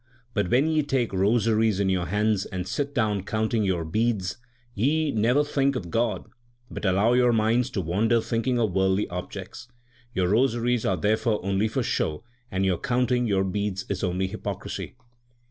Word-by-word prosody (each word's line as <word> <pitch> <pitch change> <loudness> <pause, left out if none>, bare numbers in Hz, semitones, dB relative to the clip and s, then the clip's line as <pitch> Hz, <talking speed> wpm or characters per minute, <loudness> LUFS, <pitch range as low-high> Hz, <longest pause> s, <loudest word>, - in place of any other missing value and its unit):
But 105 -5 0
when 130 +4 +3
ye 155 -1 +2
take 135 -7 -1
rosaries 110 +1 +2
in 100 - +1
your 95 -2 0
hands, 105 0 +1
and 90 -1 -5
sit 140 +4 -3
down 105 -5 +1
counting 110 +2 -1
your 90 -4 0
beads, 100 +1 -1 0.4
ye 145 +8 +1
never 120 +6 +2
think 140 -2 0
of 90 -9 -5
God, 115 +2 0 0.5
but - - -5
allow 100 +5 +3
your 125 -1 +4
minds 115 +2 +2
to 95 - -2
wander 105 +8 +2
thinking 115 +2 -1
of 110 -6 0
worldly 95 +1 +2
objects. 90 +6 -7 0.5
Your 90 -1 +1
rosaries 120 +1 +1
are 95 - +1
therefore 105 +4 +1
only 100 +2 +1
for - - -1
show, 75 +7 -1 0.3
and 95 +1 -1
your 95 -2 +1
counting 125 -2 +1
your 95 -2 +2
beads 95 0 -2
is 95 -2 -3
only 90 +1 0
hypocrisy. 100 +2 -5
110 Hz, 170 wpm, -25 LUFS, 95-120 Hz, 0.5 s, your